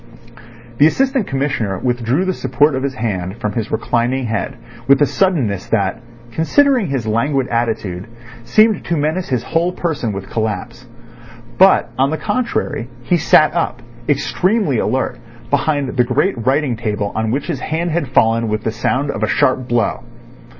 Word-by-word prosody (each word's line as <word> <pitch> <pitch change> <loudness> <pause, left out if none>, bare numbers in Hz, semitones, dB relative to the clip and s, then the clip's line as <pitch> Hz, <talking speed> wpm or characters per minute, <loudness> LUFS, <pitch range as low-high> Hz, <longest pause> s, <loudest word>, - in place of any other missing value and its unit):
The 150 - +7
Assistant 265 - +1
Commissioner 135 -8 -1
withdrew 125 - 0
the 185 - 0
support 135 +1 +2
of 130 - -1
his 135 -1 -2
hand 100 -4 -3
from 105 -3 -2
his 110 0 -3
reclining 120 +3 0
head 110 -4 -3 0.3
with 135 0 +6
a 145 - +5
suddenness 135 - 0
that, 115 +1 0 0.3
considering 250 - +2
his 135 -5 -2
languid 130 +5 0
attitude, 110 -6 -2 0.4
seemed 215 - +3
to 170 - -1
menace 155 +5 -1
his 125 -3 0
whole 170 +2 0
person 160 -10 -2
with 95 -1 -6
collapse. 115 +3 -4 0.7
But, 190 +1 +5
on 135 +1 +3
the 160 - -2
contrary, 195 - -2
he 175 +8 +2
sat 155 -1 +4
up, 130 -8 -2 0.3
extremely 165 - +1
alert, 130 -1 -1 0.3
behind 145 -1 +1
the 125 - +4
great 140 +10 +1
writing 135 -2 +2
table 105 -3 -2
on 110 0 -1
which 135 +5 -1
his 165 -7 -3
hand 165 +5 -2
had 160 -3 -1
fallen 115 -2 +2
with 110 0 -2
the 110 - -1
sound 130 +5 -1
of 100 - -5
a 110 - +1
sharp 130 +2 +1
blow. 120 -3 0
130 Hz, 165 wpm, -18 LUFS, 115-155 Hz, 0.7 s, The